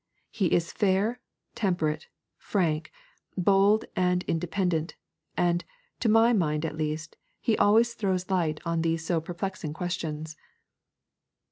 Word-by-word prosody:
He 200 -5 +1
is 170 0 +1
fair, 205 +4 +1 0.3
temperate, 160 -7 -1 0.3
frank, 160 -5 0 0.5
bold, 200 +3 +4
and 180 0 +2
independent; 170 -1 -1 0.4
and, 175 0 +2 0.4
to 230 - +1
my 225 +2 +5
mind 155 -6 +1
at 155 - -3
least, 155 0 -3 0.2
he 230 -3 +1
always 230 +3 +5
throws 190 -4 -1
light 165 -5 +1
on 165 -1 0
these 165 0 0
so 165 -1 +1
perplexing 175 -2 -4
questions.' 160 -2 -4
175 Hz, 120 wpm, -28 LUFS, 160-195 Hz, 0.5 s, my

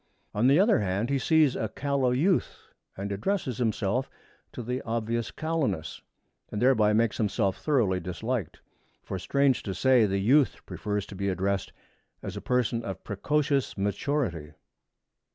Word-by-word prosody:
On 110 +4 +2
the 140 +5 +5
other 205 - +4
hand, 100 +5 -1
he 140 - +2
sees 155 -2 +3
a 110 - -2
callow 140 -2 0
youth 160 +10 0 0.3
and 100 +1 -4
addresses 130 - -2
himself 115 +2 0 0.4
to 120 - -6
the 125 +3 -3
obvious 115 0 -2
callowness, 150 - -2 0.5
and 105 - -3
thereby 115 -4 +4
makes 115 +1 +2
himself 100 -2 0
thoroughly 115 -12 +2
disliked. 95 +3 -4 0.4
For, 95 - -5
strange 140 +5 +2
to 95 -3 -5
say, 125 0 +4
the 100 0 0
youth 130 +8 +2
prefers 105 -2 -3
to 100 - -10
be 100 +1 -1
addressed 95 +1 -1 0.5
as - - -5
a - - -5
person 125 -2 0
of 95 -1 -6
precocious 140 +6 0
maturity. 100 - -2
115 Hz, 150 wpm, -27 LUFS, 100-135 Hz, 0.5 s, the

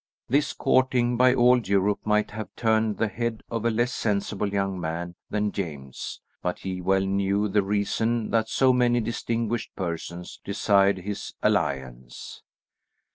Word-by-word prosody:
This 140 +3 +1
courting 125 -2 +2
by 125 +1 +5
all 125 +1 +5
Europe 100 -1 +1
might 105 0 +1
have 105 -2 -6
turned 110 -2 +1
the 115 - +1
head 115 +2 -3
of 115 -1 -2
a - - +4
less 120 +2 0
sensible 100 -1 -1
young 95 -2 -1
man 85 +2 -4 0.2
than 105 -1 0
James, 70 -9 -6 0.2
but 90 - -2
he 95 -1 -5
well 95 +1 +2
knew 100 +1 +1
the 105 +1 +2
reason 105 +3 0
that 110 -1 +1
so 130 -1 +4
many 120 -1 +3
distinguished 115 0 -2
persons 85 -1 -5
desired 100 -1 +3
his 100 +2 -6
alliance. 65 -3 -2
105 Hz, 145 wpm, -26 LUFS, 95-115 Hz, 0.2 s, by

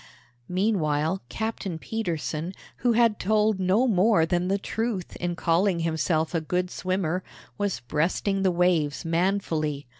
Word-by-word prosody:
Meanwhile 180 -3 +1
Captain 220 -6 -3
Petersen, 165 - -3 0.2
who 240 -1 +2
had 230 -2 +3
told 215 0 +2
no 190 +7 +3
more 200 -4 +4
than 175 +1 0
the 195 +1 +1
truth 215 -2 -3
in 175 -1 -2
calling 170 +2 +2
himself 160 0 0
a 165 - +1
good 180 +3 -1
swimmer, 185 -1 -1 0.4
was 205 -2 -1
breasting 165 +9 0
the 190 - +3
waves 170 -4 +1
manfully. 165 -4 0
180 Hz, 130 wpm, -26 LUFS, 165-200 Hz, 0.4 s, more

